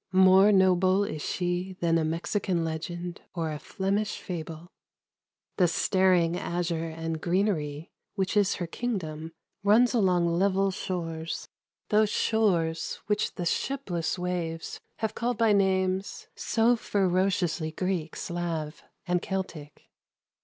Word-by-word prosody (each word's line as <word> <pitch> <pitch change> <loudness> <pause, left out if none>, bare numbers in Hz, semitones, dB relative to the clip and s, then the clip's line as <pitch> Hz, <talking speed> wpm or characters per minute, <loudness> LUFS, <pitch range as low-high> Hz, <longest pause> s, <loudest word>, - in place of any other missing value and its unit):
More 190 +2 +7
noble 190 0 +4
is 200 -7 -4
she 180 +3 -2
than 165 -1 +2
a - - +1
M 160 +1 0
nd 175 -1 -3
or 165 -2 -2
a 150 - -5
Flemish 200 +6 -2
fabl< 165 -1 -6 0.9
:ig 180 -1 +3
azure 170 -1 -2
and 160 0 -4
greener 195 +4 +2
v 150 0 -6 0.3
winch 190 +2 0
is 205 -2 +3
her 175 - -3
kingdom 165 -6 -4 0.3
runs 225 +5 +5
along 185 -6 +3
level 195 0 +2
shores, 165 -4 -4 0.4
those 215 0 +4
shores 180 -9 +1
which 210 0 0
the 175 - -3
shipless 180 -6 -1
wa\ 180 -2 -2 0.6
called 240 0 -1
1>\ 225 -2 +4
nam. 190 -1 +2 0.2
< - - -25
so 230 +1 +2
ferociously 185 -5 0
Greek, 175 -2 -2
Slav 165 -3 -4 0.2
and 180 -1 +1
Celtic. 170 -6 -5
180 Hz, 120 wpm, -28 LUFS, 165-195 Hz, 0.9 s, More